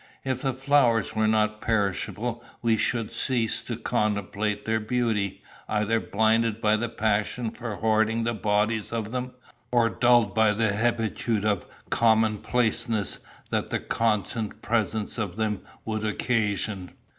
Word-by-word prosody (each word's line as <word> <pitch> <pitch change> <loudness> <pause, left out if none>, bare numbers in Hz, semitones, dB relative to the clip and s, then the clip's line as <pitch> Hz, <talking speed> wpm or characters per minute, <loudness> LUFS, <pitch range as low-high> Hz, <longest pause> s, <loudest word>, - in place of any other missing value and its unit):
If 130 -1 -1
the 135 -2 0
flowers 125 -6 +2
were 110 0 +2
not 110 0 +1
perishable, 110 +2 -1 0.2
we 115 -1 +3
should 115 0 0
cease 120 -4 +2
to 120 - -4
contemplate 105 -2 -1
their 110 0 +1
beauty, 110 -3 -1 0.3
either 105 +1 +1
blinded 110 +1 +1
by 110 -2 +3
the 120 +1 -2
passion 110 +1 -1
for 115 -3 -6
hoarding 110 +1 +1
the 115 +1 0
bodies 105 +1 0
of 110 -2 -3
them, 125 0 -3 0.4
or 120 -2 +3
dulled 120 -4 +3
by 110 -1 +4
the 110 -1 +1
hebetude 110 -1 0
of 105 -4 0 0.2
commonplaceness 110 0 +2 0.3
that - - -1
the - - -1
constant 110 0 -1
presence 110 0 -1
of 100 -5 -3
them 110 -2 -1 0.2
would 110 -1 -2
occasion. 105 -4 -1
110 Hz, 135 wpm, -26 LUFS, 105-115 Hz, 0.4 s, by